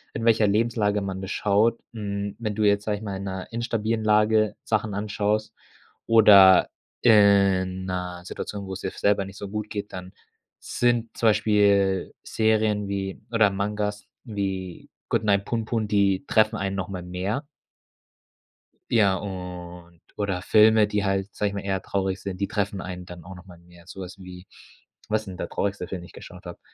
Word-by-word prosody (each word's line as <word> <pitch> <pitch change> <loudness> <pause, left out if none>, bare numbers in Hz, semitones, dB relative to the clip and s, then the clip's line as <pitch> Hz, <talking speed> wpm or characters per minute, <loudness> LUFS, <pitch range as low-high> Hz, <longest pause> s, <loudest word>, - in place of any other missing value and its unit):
in 115 - -3
welcher 110 -2 +4
Lebenslage 105 -1 +1
man 95 -1 -4
das 95 - -6
schaut. 105 +4 +2
Hm, 100 -2 -4
wenn 110 -3 -3
du 110 - 0
jetzt, 100 0 +3
sage 105 -1 -1
ich 110 - -10
mal, 100 -2 -4
in 100 - -6
'ner 95 -1 -5
instabilen 115 -1 -2
Lage 110 0 +3
Sachen 110 -2 -1
anschaust 105 +1 -1 0.5
oder 100 -5 +7 0.3
in 100 -4 +4
'ner 90 -1 -4
Situation, 100 +2 -6
wo's 95 0 -6
dir - - -3
f - - -8
selber 100 -1 +2
nicht 95 +1 -11
so 100 - -7
gut 105 0 -4
geht, 105 -2 -6
dann 90 0 -8 0.4
sind 120 -2 -1
zum 115 - +3
Beispiel 100 -3 +2
Serien 110 -2 +1
wie 95 -1 -4
oder 110 -3 +4
Mangas 105 +1 -3 0.2
wie 95 -5 -5 0.2
„Goodnight, 100 -2 +1
Punpun“, 115 -1 -2
die 100 +1 +1
treffen 110 -2 +3
einen 95 -1 -2
noch 95 -1 -3
mal 90 -3 -6
mehr. 95 +9 -3 1.5
Ja, 100 -5 +4
und 90 -3 -8 0.2
oder 100 -3 -2
Filme, 110 0 +5
die 105 -1 -1
halt, 95 +1 -1
sage 105 -1 -1
ich - - -8
mal, 100 - -3
eher 95 -1 -2
traurig 95 -1 -2
sind, 95 -2 -6
die 100 - 0
treffen 100 -2 -2
einen 90 -1 -7
dann 90 -2 -11
auch 95 +1 -10
noch 90 - -13
mal 90 -2 -14
mehr. 85 0 -19
So 95 - -9
was 90 +1 -9
wie 90 0 -11 0.6
was 110 0 +1
ist - - -14
denn 95 -2 -7
der - - -5
traurigste 100 -3 -2
Film, 95 -3 -5
den 85 - -10
ich - - -18
geschaut - - -12
habe? - - -9
100 Hz, 180 wpm, -25 LUFS, 95-105 Hz, 1.5 s, oder